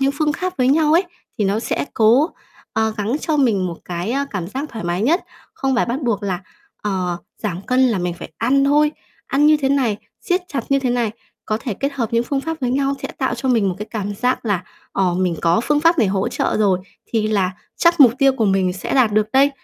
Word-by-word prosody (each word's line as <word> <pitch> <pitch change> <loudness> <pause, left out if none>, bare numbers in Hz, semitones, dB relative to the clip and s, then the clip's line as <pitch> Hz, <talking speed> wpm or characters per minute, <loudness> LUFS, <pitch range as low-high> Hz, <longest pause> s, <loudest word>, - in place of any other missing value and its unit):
những 270 +1 +2
phương 305 -1 +2
kháp 365 +3 -3
với 255 0 +3
nhau 305 +2 +3
ấy, 345 +4 +4 0.3
thì 210 - +1
nó 200 +3 +1
sẽ 225 - -2
cố, 240 +9 +4 0.4
ờ, 220 0 +1
gắng 210 +1 -1
cho 315 - 0
mình 225 -10 +2
một 170 -2 -5
cái, 175 +4 -3
á, 275 +3 0
cảm 185 -5 -3
giác 270 +8 -4
thoải 220 -9 -7
mái 175 +3 -1
nhất. 325 - +2 0.3
Không 270 -1 0
phải 240 - +2
bắt 240 +4 -2
buộc 225 -5 0
là, 185 -3 -2 0.4
ờ, 185 -4 -1 0.3
giảm 190 -3 -3
cân 255 0 +3
là 220 -5 0
mình 175 -1 -2
phải 170 - -10
ăn 265 +5 +3
thôi, 295 +2 +3 0.3
ăn 285 +2 +3
như 305 0 +6
thế 275 -2 0
này, 260 -7 +1 0.2
siết 360 +1 0
chặt 270 -7 -3
như 275 0 +3
thế 260 -2 -1
này. 240 -3 0 0.4
Có 215 - 0
thể 225 -4 -3
kết 275 +7 -2
hợp 235 -4 -3
những 230 +1 +2
phương 275 +2 -1
pháp 325 +3 -4
với 250 -2 0
nhau 275 +1 +1
sẽ - - -3
tạo 260 -3 0
cho 250 +3 -3
mình 225 -6 +3
một 180 - -2
cái 210 - -5
cảm 205 -2 -3
giác 250 +5 0
là, 200 -5 0 0.3
ờ, 185 -3 +1
mình 180 -2 0
có 170 +4 +3
phương 295 0 +2
pháp 330 +1 +4
này 225 - +4
hỗ 190 0 0
trợ - - -1
rồi, 200 -4 +3 0.3
thì 220 -2 0
là 195 -4 +1 0.3
chắc 340 -1 +3
mục 245 -5 +9
tiêu 275 -1 +5
của 240 -4 0
mình 190 -2 +2
sẽ 190 - -4
đạt 245 -6 +4
được 215 0 +2
đây. 275 +2 +5
235 Hz, 250 wpm, -20 LUFS, 200-275 Hz, 0.4 s, mục